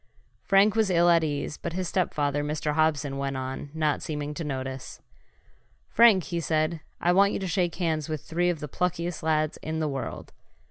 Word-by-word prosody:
Frank 195 +1 +4
was 220 -3 +2
ill 175 -1 +4
at 165 -1 +4
ease. 150 0 -3
But 170 - -5
his 185 0 -2
stepfather, 145 -6 0
Mr. 150 0 -2
Hobson, 150 -3 +1
went 135 -1 -2
on, 130 +2 -5
not 155 -1 0
seeming 150 -1 -4
to 165 - -5
notice. 130 -2 -5 0.9
"Frank," 220 -5 +6
he 170 +1 -3
said, 155 0 0 0.2
"I 175 - +2
want 200 +2 +4
you - - -1
to 190 - -3
shake 175 -1 0
hands 160 -4 -1
with 155 -2 -4
three 175 +2 0
of 170 -4 -2
the 150 - -4
pluckiest 175 +2 -2
lads 155 -1 0
in 160 +1 -3
the 155 - 0
world. 135 -2 -5
160 Hz, 190 wpm, -27 LUFS, 150-175 Hz, 0.9 s, Frank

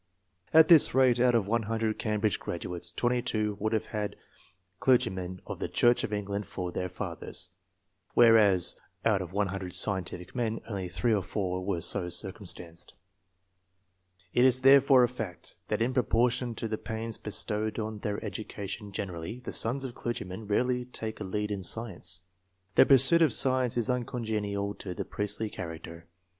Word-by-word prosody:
At 160 0 +7
this 165 -6 +6
rate, 130 -2 +4
out 125 0 +4
of 115 -4 +2
100 110 0 -1
Cam 105 -2 -1
bridge 110 -4 +1
graduates, 85 0 -4
22 120 -4 -1
would 110 +1 -1
have 110 -2 0
had 105 -1 -3 0.6
clergy 125 -7 +3
men 95 0 -6
of - - -6
the - - -2
Church 120 0 +3
of - - -3
England 105 0 -3
for 90 -1 -5
their 90 +1 -3
fathers, 90 - -5 0.7
whereas 110 -6 +5 0.3
out 105 -4 +3
of 90 -2 -6
100 95 -2 -2
scientific 95 -3 -1
men 115 -2 -1
only 95 -5 -4
3 110 +6 0
or 105 - +2
4 90 0 -3
were 90 -3 -2
so 90 +2 0
circumstanced. 90 -3 -1 1.4
It 125 - +4
is 130 0 +4
therefore 135 -1 +7
a - - +4
fact, 110 -8 -7
that - - 0
in 125 +2 -1
proportion 125 0 +1
to 115 - -3
the 110 0 -3
pains 110 0 -4
bestowed 105 +1 -1
on 110 -1 -4
their 105 -1 -3
education 105 0 -6
generally, 95 +4 -5
the - - -6
sons 125 +5 +1
of 130 -2 -5
clergymen 110 -4 -5
rarely 125 +4 +1
take 110 -3 -5
a - - -4
lead 105 +2 -3
in 100 -1 -3
science. 100 -1 0 0.5
The - - +6
pursuit 145 +5 +6
of 160 -5 +4
science 130 -2 +2
is 120 - +2
uncongenial 110 -5 -2
to 90 -3 -6
the - - -4
priestly 105 +1 -1
character. 85 -1 -8
110 Hz, 165 wpm, -29 LUFS, 95-120 Hz, 1.4 s, At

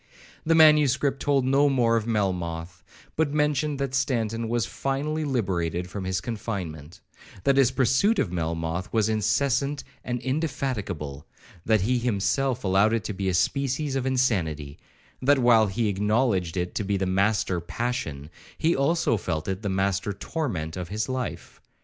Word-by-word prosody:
The 165 +1 +3
manuscript 150 -3 +5
told 140 -3 +2
no 140 +2 +4
more 120 -4 +2
of 115 -1 -1
Melmoth, 90 -5 -2 0.3
but 150 -2 0
mentioned 150 -1 +1
that 135 -1 -3
Stanton 115 -4 -1
was 120 -3 +1
finally 145 +6 -2
liberated 90 - -1
from 100 -2 -5
his 95 -1 -1
confinement,—that 95 - -4
his 135 -3 +5
pursuit 130 - +2
of - - 0
Melmoth 85 +2 -3
was 110 -1 +2
incessant 135 +6 +1 0.2
and 120 0 -3
indefatigable,—that 110 - -3
he 125 +5 +1
himself 125 +3 0
allowed 100 +3 +3
it 115 -3 0
to 105 - -4
be 95 0 -2
a 90 - 0
species 135 - 0
of 135 -1 -1
insanity,—that 110 - -1
while 120 -4 +5
he 110 +3 -1
acknowledged 105 -3 +1
it 90 0 -2
to 105 - -2
be 100 0 0
the 95 - -1
master 95 -1 +1
passion, 85 - -4 0.3
he 165 +1 +2
also 140 -3 +2
felt 80 -5 -3
it 95 +1 -3
the 105 - -2
master 100 +1 0
torment 95 - -4
of 90 -2 -5
his 110 +2 -2
life. 130 -3 -5
110 Hz, 150 wpm, -26 LUFS, 95-135 Hz, 0.3 s, manuscript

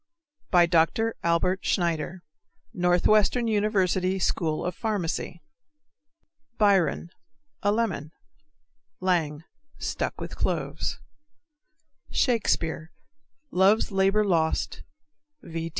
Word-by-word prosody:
_) 175 -1 +5 0.3
DR. 225 0 0
ALBERT 170 +3 +1
SCHNEIDER, 175 0 -1 0.5
Northwestern 200 +5 +3
University 195 -3 +1
School 165 -4 -1
of 180 - -2
Pharmacy. 180 -6 -3 1.1
Biron 195 -4 +2 0.5
A 205 - +2
lemon. 200 -9 -1 0.9
Lang 165 -5 0 0.3
Stuck - - -3
with - - -6
cloves. - - -2 1.1
_Shakespeare, 170 - 0 0.6
Love's 195 +5 +3
Labor 195 +2 +2
Lost, 165 -5 0 0.6
V. 165 0 -5
185 Hz, 80 wpm, -26 LUFS, 170-205 Hz, 1.1 s, _)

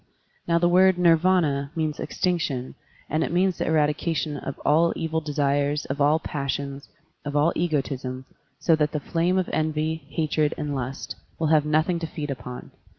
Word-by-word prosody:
Now 170 0 +3
the 175 +1 +3
word 185 +1 +5
Nirvdna 165 -5 +3
means 155 -2 -2
"extinction 155 -8 -1 0.3
and 155 +2 0
it - - -2
means 180 +1 +1
the - - -1
eradication 155 0 0
of 140 -1 -6
all 165 +3 +4
evil 160 0 -2
desires, 145 0 0
of 140 +2 -3
all 150 +2 +4
passions, 140 -2 -4 0.3
of 145 0 -5
all 150 +3 +3
egotism, 135 -5 -2 0.3
so 165 - +3
that 150 -1 0
the 150 - 0
flame 170 +5 0
of 185 - +1
envy, 155 0 -1
hatred, 155 -1 0
and 150 -1 -3
lust 130 0 -5 0.2
will 160 -2 0
have 155 -2 +4
nothing 155 +3 +2
to 165 - -3
feed 150 -2 -5
upon. 125 -1 -7
155 Hz, 165 wpm, -25 LUFS, 145-165 Hz, 0.3 s, word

